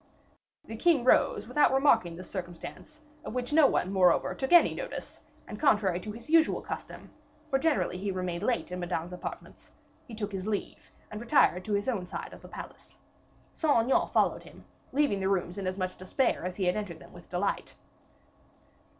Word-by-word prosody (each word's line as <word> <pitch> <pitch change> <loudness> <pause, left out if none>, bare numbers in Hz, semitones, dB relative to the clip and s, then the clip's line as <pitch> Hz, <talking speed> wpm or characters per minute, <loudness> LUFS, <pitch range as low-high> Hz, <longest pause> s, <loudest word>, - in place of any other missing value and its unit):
The 225 - -7
king 295 +2 +3
rose, 255 - +3
without 295 -1 +3
remarking 265 - +3
this 185 +2 -10
circumstance, 185 - -8 0.2
of - - -7
which 250 +3 -3
no 305 -2 +7
one, 190 - 0
moreover, 185 -2 +3
took 265 - -4
any 345 -1 +7
notice, - - -7 0.3
and, - - -8
contrary 205 - +3
to 210 +3 -6
his 230 +4 -11
usual 320 0 +4
custom, - - -7 0.4
for 270 - +3
generally 290 - 0
he 200 +1 -3
remained 180 -2 -3
late 235 -3 -1
in 180 - -4
Madame's 175 0 -3
apartments, 180 - -8 0.4
he 230 - -9
took 210 -1 -4
his 195 0 -5
leave, 210 -2 -4 0.2
and 210 +1 -6
retired 185 -6 +3
to 215 - -2
his 205 +3 0
own 200 -8 -1
side - - -6
of - - -12
the - - -12
palace. - - -11 0.6
Saint 310 -5 +2
Aignan 260 +3 +2
followed - - +2
him, - - -15 0.3
leaving 275 -7 +1
the 190 0 0
rooms 180 -1 -1
in 190 - -3
as 185 +1 -2
much 185 -1 -3
despair 190 +2 0
as 180 0 -4
he 195 - -1
had 180 - +2
entered 205 -6 -4
them - - -16
with 175 - -14
delight. 180 +3 -2
205 Hz, 190 wpm, -29 LUFS, 180-265 Hz, 0.6 s, no